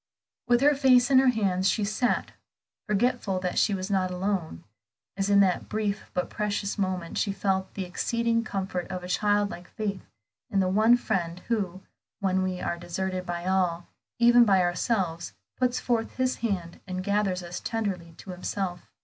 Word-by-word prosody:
With 240 0 +4
her 290 +1 +6
face 260 -2 +4
in 260 - +7
her 265 - +4
hands, 195 -6 +2
she 215 - 0
sat, 215 +4 0 0.6
forgetful 210 -2 +1
that 180 -1 0
she 205 - +2
was 190 +1 -4
not 190 -2 +1
alone, 180 - -2 0.5
as 195 +1 -1
in 200 0 +6
that 185 -2 +1
brief 210 -1 -2
but 180 - 0
precious 205 -1 -2
moment 185 -4 -2
she 200 - +1
felt 190 -1 -1
the 195 - -3
exceeding 230 +5 0
comfort 190 -4 -3
of 185 -1 -5
a - - -6
childlike 205 -1 0
faith 200 -3 -4 0.5
in 200 -4 +1
the 190 - +2
one 220 +5 +5
Friend 180 -8 -2
who, 195 -5 -1 0.4
when 190 -1 +1
we 185 -1 -2
are 170 - -3
deserted 185 +1 -3
by 175 0 -3
all, 180 -2 +1 0.3
even 240 0 +7
by 195 -4 +4
ourselves, 175 -2 -1 0.2
puts 255 -1 +1
forth 230 -2 -1
His 255 0 0
hand 185 -7 -3
and 185 0 -4
gathers 200 -2 0
us 175 0 -6
tenderly 195 -7 -3
to 190 - -9
Himself. 180 0 -4
195 Hz, 170 wpm, -27 LUFS, 180-220 Hz, 0.6 s, in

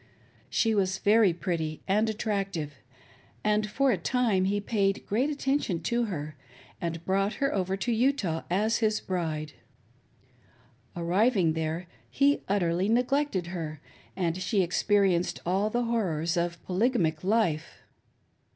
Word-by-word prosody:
She 225 -1 +2
was 190 -2 +1
very 210 -2 +4
pretty 165 -3 -3
and 210 +3 +2
attractive, 195 -8 -2 0.7
and 210 0 +1
for 270 +4 +2
a - - 0
time. 230 -7 +1
he 205 +2 +1
paid 200 -2 0
great 245 +8 +1
attention 275 - 0
to 235 +7 0
her, 155 -7 -5 0.5
and 170 -1 -4
brought 195 +2 +1
her 275 -1 0
over 190 -1 -1
to 240 +5 -1
Utah 225 - +1
as 210 +6 +2
his 215 -2 +1
bride. 155 -5 -3 1.4
Arrived 180 +1 +2
there 160 +2 -2 0.2
he 285 +1 +2
utterly 185 -1 +1
neglected 250 -4 +1
her, 155 -4 -5 0.4
and 175 -2 -1
she 195 +1 +2
experienced 185 0 +1
all 190 +4 +1
the 240 +2 0
horrors 180 -8 0
of 170 -1 -1
polygamic 185 -6 +1
life. 185 -6 0
195 Hz, 130 wpm, -28 LUFS, 170-225 Hz, 1.4 s, very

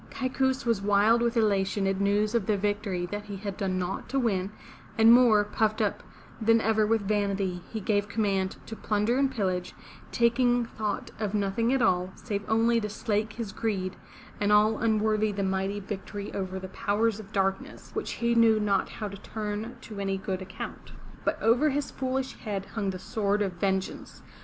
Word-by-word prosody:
Kaikous 265 0 -1
was 230 -4 +1
wild 205 +3 +4
with 235 0 +1
elation 200 -2 +2
at 195 0 0
news 205 +2 +2
of 230 -5 0
the 210 - +2
victory 205 -3 -1
that 205 +3 -5
he 205 -1 -6
had 200 0 -5
done 190 -3 -1
naught 185 +1 -3
to 275 - -1
win, 200 -7 +1 0.5
and, 225 +1 +8
more 235 -4 +6
puffed 215 +1 0
up 210 -2 0 0.4
than 225 +1 +5
ever 220 -1 +2
with 225 -1 +2
vanity, 200 -3 0
he 220 - -4
gave 205 0 0
command 195 -3 0
to 225 - -7
plunder 215 +4 0
and 275 -1 +3
pillage, 185 -7 -2 0.4
taking 240 +1 +3
thought 210 -3 -4
of 210 -1 -2
nothing 205 +4 +1
at 265 -2 +2
all, 180 +1 +2
save 205 -3 -4
only 230 +1 +3
to 210 - -3
slake 210 +1 -1
his 225 -3 -5
greed, 195 -3 -2 0.4
and 205 0 +1
all 215 +1 +4
unworthy 215 -1 +2
the 200 -1 -2
mighty 190 +1 -1
victory 200 0 -6
over 190 -1 -3
the 190 0 -6
powers 220 +1 0
of 215 -1 -11
darkness, 195 -1 -2
which - - -3
he 235 0 0
knew 230 -2 +5
not 205 -2 +1
how 215 - -5
to 200 0 -8
turn 215 +2 -4
to 210 -3 -8
any 195 -1 -1
good 190 -1 -3
account. 190 0 -8 0.3
But - - 0
over 245 +7 +4
his 285 0 -2
foolish 265 0 -2
head 200 -4 -4
hung 210 -4 -1
the 185 - -3
sword 205 0 0
of 195 - -1
vengeance. 190 +1 -3
210 Hz, 185 wpm, -28 LUFS, 195-225 Hz, 0.5 s, and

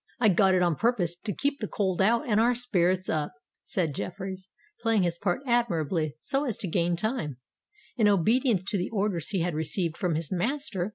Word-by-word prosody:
"I 225 -3 +5
got 190 0 +4
it 180 - +3
on 170 -4 +1
purpose 220 -8 +1
to 210 - -1
keep 280 +7 -1
the 215 - -3
cold 190 -3 -1
out 230 +5 +2
and 215 -2 +3
our 240 +2 +3
spirits 185 -6 +1
up," 150 -2 -1 0.3
said 165 -6 -2
Jeffreys, 190 +3 -6 0.3
playing 225 - +2
his 170 -1 -1
part 190 +4 0
admirably 170 - 0
so 275 - -1
as 240 -7 -1
to 195 - -4
gain 170 +1 +1
time, 170 - -2 0.6
in 220 -3 +4
obedience 210 - +3
to 200 - 0
the 180 - -2
orders 195 -6 -1
he 190 -4 -1
had 175 0 -1
received 160 +2 -1
from 180 -5 0
his 160 -1 -3
master. 215 - -1
190 Hz, 195 wpm, -27 LUFS, 170-225 Hz, 0.6 s, I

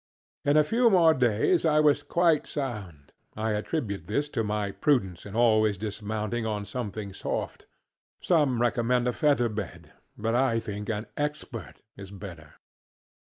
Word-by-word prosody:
In 145 +1 +3
a 155 - +6
few 235 +9 +3
more 170 -5 +6
days 125 - +2
I 155 -2 +3
was 150 -1 +4
quite 170 -3 +2
sound. 105 - -5 0.3
I 110 +1 -1
attribute 105 - -3
this 145 +8 -1
to 115 - -1
my 105 -1 -1
prudence 95 - 0
in 100 - -9
always 110 -3 +3
dismounting 110 +2 -3
on 105 -2 -2
something 105 -2 -5
soft. - - -4 0.5
Some 145 -8 +2
recommend 120 +1 +1
a 125 - +1
feather 140 -4 +2
bed, 110 -1 -6 0.3
but 115 +2 -1
I 120 -2 +2
think 105 -2 -6
an 110 0 -2
Expert 150 -5 -5
is 100 -1 -9
better. 90 -7 -10
115 Hz, 150 wpm, -27 LUFS, 105-145 Hz, 0.5 s, a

